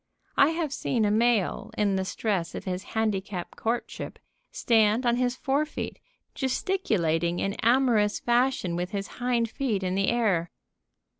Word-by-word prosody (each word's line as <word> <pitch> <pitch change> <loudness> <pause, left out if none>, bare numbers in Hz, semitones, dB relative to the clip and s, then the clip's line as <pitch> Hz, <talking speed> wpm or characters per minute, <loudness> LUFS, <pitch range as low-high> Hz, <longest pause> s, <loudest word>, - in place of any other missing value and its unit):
I 280 - +6
have 325 -3 -2
seen 230 -6 0
a 205 - +2
male, 225 -2 +1
in 200 -2 +2
the 190 0 -1
stress 190 -4 -2
of - - -5
his 185 -1 -3 0.2
handicap 200 -4 -2
courtship, 235 +2 -3 0.3
stand 230 - +3
on 240 0 +3
his 250 0 +1
fore 275 +3 +1
feet, 305 - -6 0.3
gesticulating 185 - 0
in 195 +2 -1
amorous 230 -4 +3
fashion 240 -7 +1
with 180 +1 -2
his 200 -1 -2 0.2
hind 240 -2 +1
feet 220 -8 -1
in 185 0 -1
the 195 +1 +1
air. 200 -8 +1
220 Hz, 150 wpm, -27 LUFS, 190-250 Hz, 0.3 s, I